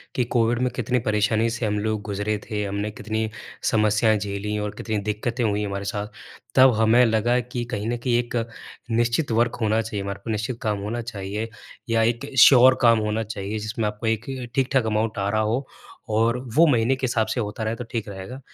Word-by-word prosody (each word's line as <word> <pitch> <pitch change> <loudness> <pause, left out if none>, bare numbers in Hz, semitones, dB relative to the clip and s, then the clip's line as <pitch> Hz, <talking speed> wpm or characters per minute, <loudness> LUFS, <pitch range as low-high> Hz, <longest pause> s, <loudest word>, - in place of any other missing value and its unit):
कि 125 - +2
कोविड 120 0 +3
में 125 - +2
कितनी 125 0 0
परेशानी 110 +2 +2
से 120 0 -3
हम 105 0 0
लोग 110 0 -1
गुजरे 105 +1 -2
थे, 105 -1 -2
हमने 100 +2 -3
कितनी 110 +1 -3 0.4
समस्याएँ 110 0 +3
झेलीं 105 +1 -3
और 105 0 -2
कितनी 110 -2 -2
दिक्कतें 110 +4 -2
हुईं 105 -1 0
हमारे 100 0 -4
साथ। 100 +1 -3 0.5
तब 130 -1 +7
हमें 110 +3 +5
लगा 115 +2 +2
कि 125 0 -4
कहीं 110 -2 -3
न 120 - -1
कहीं 120 0 +1
एक 120 0 -4 0.6
निश्चित 120 +4 +1
वर्क 115 +1 +2
होना 110 +1 +2
चाहिए, 105 -3 -4
हमारे 100 0 -5
को - - -7
निश्चित 115 +3 -2
काम 105 -2 0
होना 110 +4 -3
चाहिए 105 -1 -5 0.4
या 115 0 +3
एक 120 +4 -1
श्योर 130 0 +8
काम 115 -2 +5
होना 105 +1 -1
चाहिए, 105 0 -4
जिसमें 110 +1 -2
आपको 105 +2 -4
एक 110 0 0 0.3
ठीक-ठाक 135 -2 +2
अमाउंट 110 0 0
आ 100 0 0
रहा 110 +1 +1
हो 115 +5 0 0.4
और 115 +3 +2 0.2
वो 165 +2 +7
महीने 125 -2 +3
के 130 0 -2
हिसाब 115 -3 +1
से 120 - -2
होता 105 0 -3
रहे 110 +1 -1
तो 120 - -6
ठीक 115 -4 -3
रहेगा। 100 +7 -8
110 Hz, 205 wpm, -24 LUFS, 105-120 Hz, 0.6 s, श्योर